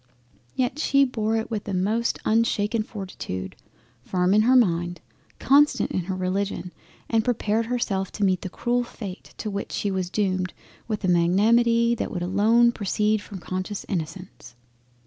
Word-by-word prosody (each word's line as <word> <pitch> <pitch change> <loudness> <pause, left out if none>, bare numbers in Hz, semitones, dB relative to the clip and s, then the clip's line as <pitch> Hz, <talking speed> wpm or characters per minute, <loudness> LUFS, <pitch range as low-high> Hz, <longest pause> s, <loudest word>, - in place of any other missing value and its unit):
Yet 255 +3 -1
she 275 -2 +4
bore 225 -4 -1
it 225 +1 -4
with 210 -2 -3
a 195 - -2
most 215 +6 0
unshaken 220 -1 +1
fortitude, 185 - -6 0.5
firm 180 +6 +1
in 210 - +5
her 250 +4 +4
mind; 175 -7 +2 0.4
constant 290 +2 +3
in 185 - -2
her 190 0 -3
Religion; 185 -1 -2 0.3
and 225 -1 +2
prepared 225 -1 0
herself 215 -6 -1
to 205 - -3
meet 185 -2 +2
the 185 - -5
cruel 245 +6 0
fate 205 -5 -9
to 215 - -4
which 200 0 -4
she 205 - -1
was 185 -2 -2
doomed, 185 -2 -1 0.3
with 215 -2 -3
a - - +1
magnanimity 230 +7 +3
that 235 - -2
would 175 -2 -4
alone 220 +6 +4
proceed 210 0 0
from 205 -1 -9
conscious 185 +3 -5
Innocence. 170 - -6
205 Hz, 160 wpm, -24 LUFS, 185-230 Hz, 0.5 s, in